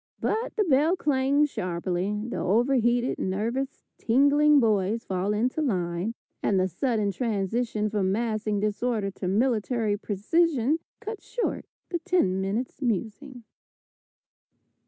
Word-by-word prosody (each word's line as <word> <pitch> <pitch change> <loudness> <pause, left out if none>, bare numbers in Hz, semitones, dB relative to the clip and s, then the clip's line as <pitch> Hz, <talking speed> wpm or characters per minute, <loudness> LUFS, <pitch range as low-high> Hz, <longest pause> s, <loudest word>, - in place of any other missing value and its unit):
But 450 +3 -1
the 430 - +2
bell 310 +1 +3
clangs 285 -2 +2
sharply, 185 +4 -2
the 240 - -4
overheated, 240 +3 +2
nervous, 230 +9 -2 0.2
tingling 285 +4 +4
boys 215 -1 +1
fall 190 +2 -1
into 245 +8 0
line, 185 - -1 0.3
and 195 - +2
the 185 - +2
sudden 210 - 0
transition 215 0 -1
from 205 -3 0
massing 215 -1 -1
disorder 210 0 -1
to 185 0 -5
military 220 0 +1
precision 275 - +1 0.2
cuts 440 -1 -7
short 485 - -2 0.2
the 345 - -2
ten 190 - +1
minutes' 220 +8 -3
musing. 240 +2 -3
230 Hz, 115 wpm, -26 LUFS, 200-270 Hz, 0.3 s, tingling